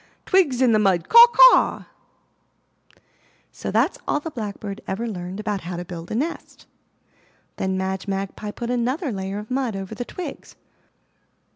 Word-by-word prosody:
Twigs 295 -10 +2
in 245 - +4
the 215 - +3
mud! 190 -5 +1
Caw! 470 +1 +10
caw!'* - - +6 1.7
So - - -6
that's - - +1
all - - +1
the 325 +2 -7
Blackbird 205 -4 -6
ever 225 +5 -3
learned 185 -2 -6
about 210 -2 -3
how 175 +2 -6
to 175 - -6
build 170 -1 -8
a - - -3
nest. 305 +8 -5 0.9
Then 190 0 -1
Madge 190 +1 -3
Magpie 195 +2 -4
put 235 +3 -5
another 255 +5 -1
layer 195 -1 -4
of 210 +3 -8
mud 255 -4 -1
over 195 +2 -6
the 220 - -4
twigs. 360 +8 -8
210 Hz, 155 wpm, -22 LUFS, 190-255 Hz, 1.7 s, Caw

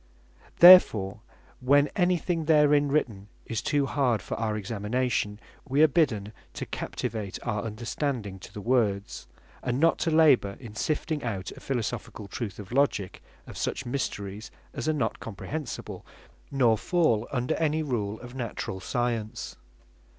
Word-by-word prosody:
Therefore, 110 - +8 0.4
when 140 +3 +4
any 180 -1 +2
thing 165 -1 -2
therein 150 -2 +4
written 110 -9 -1 0.2
is 115 -1 -3
too 145 +3 +1
hard 130 -5 +1
for - - -7
our 110 -1 -1
examination, 105 0 -2 0.3
wee 140 +4 +4
are - - +8
bidden 110 -9 0 0.2
to - - -4
captivate 105 -4 -4
our 105 -3 -1
understanding 115 -1 -3
to - - -12
the 105 - -8
Words; 105 -4 0 0.3
and 125 +1 -1
not 165 +2 +3
to 165 - 0
labour 150 -11 +4
in 115 -5 -10
sifting 155 +4 -2
out 100 -6 -4
a - - -11
Philosophicall 110 -5 -4
truth 115 -5 -5
by 105 - -6
Logick, 135 -9 0 0.2
of - - -9
such 135 - -2
mysteries 110 -5 -4 0.2
as 155 - -2
are - - +2
not 125 -7 -1
comprehensible, 130 +6 -6 0.5
nor 120 -6 +3
fall 140 -11 +1
under 125 -2 0
any 155 0 +1
rule 110 -7 -2
of 120 0 -10
naturall 115 -6 -4
science. 115 0 -3
120 Hz, 145 wpm, -27 LUFS, 105-145 Hz, 0.5 s, Therefore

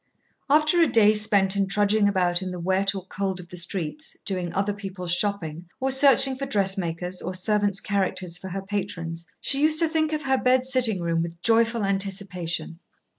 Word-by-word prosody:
After 305 +4 +4
a 330 - +5
day 220 -4 +5
spent 205 -2 +3
in 195 -1 +1
trudging 205 +1 +2
about 180 -2 +1
in 185 - -4
the 180 -1 -6
wet 190 +3 0
or 190 -2 -6
cold 190 -1 -3
of 175 -1 -11
the 180 - -9
streets, 180 - -3
doing 180 -4 -2
other 200 +1 -1
people's 190 -3 -4
shopping, 175 -4 -2
or 265 +1 0
searching 270 0 +5
for 275 +1 -5
dressmakers 185 -3 -1
or 185 - -4
servants' 205 +1 +1
characters 185 -3 -2
for 190 - -8
her 190 +1 -5
patrons, 180 -4 -4
she 275 0 +1
used 310 +1 +3
to 330 0 +4
think 315 -1 0
of 305 -1 -2
her 265 -1 +1
bed 255 0 +2
sitting 245 -8 +1
room 165 -1 0
with 170 0 -5
joyful 230 0 +2
anticipation. 190 -4 -3
195 Hz, 185 wpm, -25 LUFS, 180-230 Hz, -, a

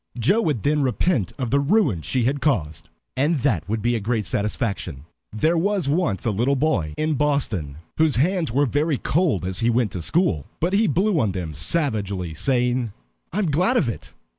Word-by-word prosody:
Joe 190 - +2
would 145 - -1
then 150 +1 +2
repent 130 - 0
of 125 -4 -3
the 140 - +3
ruin 140 - +2
she 125 +8 -1
had 135 +4 0
caused, 85 - -1 0.3
and 145 +6 +2
that 95 - 0
would 110 0 -2
be 120 +1 +2
a - - 0
great 110 0 -1
satisfaction. 100 - -3 0.3
There 155 +11 +1
was 200 -2 0
once 140 - 0
a 115 - +2
little 120 +7 +1
boy 100 - 0
in 155 0 0
Boston 125 - 0 0.2
whose 160 -3 +4
hands 165 - +1
were 140 +5 +2
very 145 +3 0
cold 150 - 0
as 95 0 -2
he 115 - +2
went 120 -3 +1
to 90 - -5
school. 95 - +1
But 175 +4 0
he 210 +2 +3
blew 185 +4 +1
on 105 -7 0
them 85 -4 -4
savagely, 100 - 0
saying, 125 - 0 0.4
"I 185 - -5
am 190 -7 +1
glad 185 - +2
of 150 - +2
it! 115 - -6
130 Hz, 195 wpm, -22 LUFS, 105-155 Hz, 0.4 s, whose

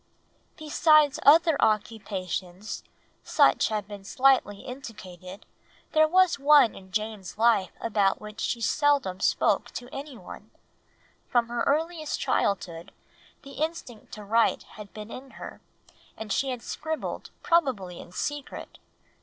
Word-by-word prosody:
_) - - -38
Besides 305 -1 +3
other 320 +1 +6
occupations, 200 -3 -2 0.4
such - - +3
as - - +2
have 210 -2 -3
been 205 -1 -9
slightly 255 -3 +2
indicated, 195 -8 -10 0.5
there 310 -1 +4
was 365 -1 +3
one 285 -4 +6
in 190 -1 -14
Jane's 210 -2 -4
life 220 -4 +3
about 205 -4 +1
which 210 0 -9
she 235 - -2
seldom 280 -9 +1
spoke - - +1
to 245 +1 -8
anyone; 250 -7 -9 0.8
from 235 -1 +1
her 240 0 -2
earliest 315 +1 -1
childhood 175 -4 -1 0.5
the 275 0 -9
instinct 315 -9 -6
to 210 - -8
write 225 +3 +2
had 210 -2 -12
been 215 +1 -9
in 265 +1 -10
her, - - -9 0.6
and 220 -2 -4
she 275 - 0
had 250 -2 -5
scribbled 315 0 -5
probably 255 - +1
in - - -12
secret. 290 +8 -5
230 Hz, 130 wpm, -27 LUFS, 200-290 Hz, 0.8 s, other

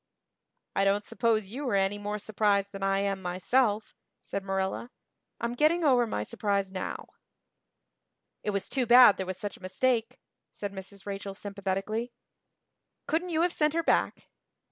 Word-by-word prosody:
"I 195 - +3
don't 200 +1 +2
suppose 225 -3 +1
you 260 +4 -4
are 200 - +1
any 195 +1 +1
more 205 +1 -3
surprised 205 -1 +1
than 195 - -8
I 195 0 +1
am 195 -1 -1
myself," 210 +5 +1 0.3
said 200 - -4
Marilla. 195 +4 -2 0.5
"I'm 235 0 -2
getting 310 +7 +3
over 250 -5 +4
my 105 - -2
surprise 200 - -1
now." 185 -1 -4 1.4
"It - - -3
was 200 -1 -1
too 255 -3 0
bad 245 -3 +8
there 190 - -3
was 185 -1 -4
such 205 0 -5
a - - -23
mistake," 230 +5 0 0.4
said 200 -1 -5
Mrs. 195 0 -9
Rachel 195 -1 -5
sympathetically. 200 +4 -3 0.9
"Couldn't 340 +3 -1
you 330 -1 +1
have 350 0 +1
sent 300 0 +1
her 335 - +1
back?" - - +1
205 Hz, 160 wpm, -29 LUFS, 195-245 Hz, 1.4 s, bad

